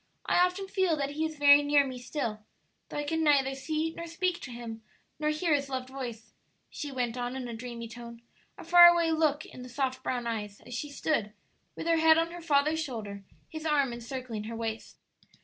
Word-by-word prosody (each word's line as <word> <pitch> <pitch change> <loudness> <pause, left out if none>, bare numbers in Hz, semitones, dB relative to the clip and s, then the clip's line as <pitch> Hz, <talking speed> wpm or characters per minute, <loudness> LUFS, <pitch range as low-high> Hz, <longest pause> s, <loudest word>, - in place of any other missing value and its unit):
I 355 - +4
often 365 +2 -1
feel 375 -5 +1
that 280 -1 -2
he 310 +2 -1
is 315 -1 -10
very 285 0 +7
near 290 -1 +4
me 260 -2 -6
still, 245 -4 -3 0.5
though - - -6
I 295 - -1
can 320 +2 -1
neither 275 -3 +3
see 310 +4 -2
nor 335 - -6
speak 350 +1 -1
to - - -7
him 235 -2 -7 0.4
nor 305 0 +1
hear 305 +2 +1
his 280 -1 0
loved 260 -1 -4
voice," 245 -4 -7 0.4
she 290 - -5
went 250 -2 -2
on, 245 +1 -3
in 260 -2 -4
a 235 - -6
dreamy 235 0 -6
tone, 235 0 -10 0.3
a - - -9
far 345 +1 +9
away 340 -1 +4
look 310 -2 +1
in 255 - -11
the 250 - -9
soft 260 0 -2
brown 245 -2 -2
eyes 210 -3 -4
as 245 - -11
she 270 +5 -4
stood, 280 -7 -1 0.4
with - - -6
her 335 0 +3
head 320 0 +6
on 330 +1 +1
her 350 0 -8
father's 310 0 +2
shoulder, 210 -7 -6 0.2
his 315 -1 -7
arm 285 -5 +2
encircling 235 -2 -6
her 230 +1 -5
waist. 225 -1 -5
280 Hz, 215 wpm, -29 LUFS, 240-315 Hz, 0.5 s, far